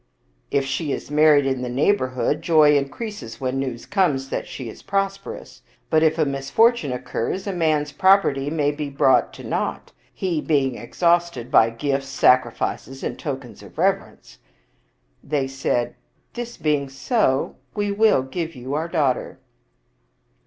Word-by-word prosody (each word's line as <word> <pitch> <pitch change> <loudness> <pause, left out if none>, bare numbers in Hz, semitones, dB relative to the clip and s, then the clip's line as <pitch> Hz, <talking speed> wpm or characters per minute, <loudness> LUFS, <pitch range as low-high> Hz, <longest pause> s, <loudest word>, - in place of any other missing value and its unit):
" - - -41
If 140 -1 +1
she 140 +3 -2
is 140 - -5
married 150 -1 +5
in 130 -2 -1
the 125 - -3
neighborhood, 130 -1 +1
joy 155 -3 +5
increases 145 - -4
when 130 0 -2
news 130 -3 -4
comes 145 -9 +1
that - - -3
she 130 - -7
is 110 - -10
prosperous; 195 0 -4 0.3
but 155 - +4
if 160 0 +3
a 155 - +2
misfor 140 - +3
tune 150 - -4
occurs, 125 +7 -3
a 200 - -2
man's 155 -4 +1
property 190 -7 +3
may 150 -2 +1
be 145 -1 -5
brought 135 -1 +3
to - - -11
naught, - - -3 0.2
he 175 -5 -2
being 135 -5 +1
exhausted 170 -1 0
by 115 - +6
gifts, 135 +3 -2
sacrifices, 130 0 +1
and - - -4
tokens 130 -6 -6
of - - -15
rev - - +4
erence." - - -18 0.9
They 140 -2 -1
said, 135 -2 -1 0.2
" - - -43
This 240 0 -6
being 150 -3 0
so, 135 - 0 0.2
we 205 0 -1
will 210 -9 +3
give 165 +4 -5 0.2
our 155 +3 -1
daughter." 140 -6 -1
145 Hz, 155 wpm, -22 LUFS, 135-170 Hz, 0.9 s, by